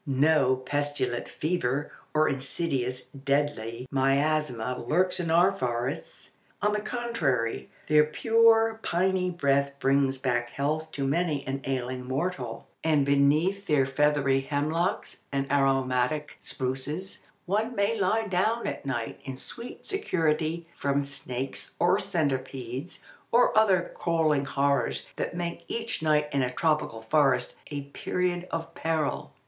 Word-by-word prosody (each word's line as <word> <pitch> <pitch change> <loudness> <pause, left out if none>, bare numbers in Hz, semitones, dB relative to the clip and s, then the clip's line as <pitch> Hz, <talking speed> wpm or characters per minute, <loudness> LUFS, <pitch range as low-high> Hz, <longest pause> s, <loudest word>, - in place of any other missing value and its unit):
No 135 -1 +4
pestilent 130 -2 -2
fever 145 -4 -1 0.2
or 155 0 +4
insidious 135 -2 -2
deadly 140 -4 -1
miasma 135 -3 +1
lurks 185 +3 +2
in 170 -2 -2
our 175 +4 +5
forests. 125 -9 -4 0.3
On 210 0 +1
the 210 - +1
contrary, 150 - -1 0.2
their 150 0 +5
pure, 225 +6 +4
piny 185 0 +1
breath 140 -4 +1
brings 135 0 +2
back 125 -2 0
health 155 +4 -2
to 140 - -2
many 150 0 0
an 135 +1 -3
ailing 130 -1 -2
mortal, 130 -4 -3 0.2
and 150 -3 +3
beneath 155 +8 +2
their 145 -4 +3
feathery 140 0 +2
hemlocks 155 +6 -2
and 135 -1 0
aromatic 135 +1 +1
spruces 135 +8 -4 0.2
one 220 +6 0
may 200 +3 +2
lie 220 +4 +2
down 215 +5 +1
at - - -4
night 120 -4 -3
in 135 -1 -6
sweet 235 - -8
security 165 - 0
from 140 0 +1
snakes, 135 -1 -5
or 185 +3 +3
centipedes, 135 - -3 0.3
or 240 +1 +4
other 195 -5 +4
crawling 155 -4 +1
horrors 135 - 0
that - - -3
make 170 -1 -3
each 230 -5 -3
night 150 -1 +3
in 140 - +1
a 125 - +1
tropical 150 -6 0
forest 140 +1 +2
a 145 -1 -3
period 175 +5 -2
of 165 0 -4
peril. 160 -2 -1
145 Hz, 130 wpm, -28 LUFS, 135-175 Hz, 0.3 s, our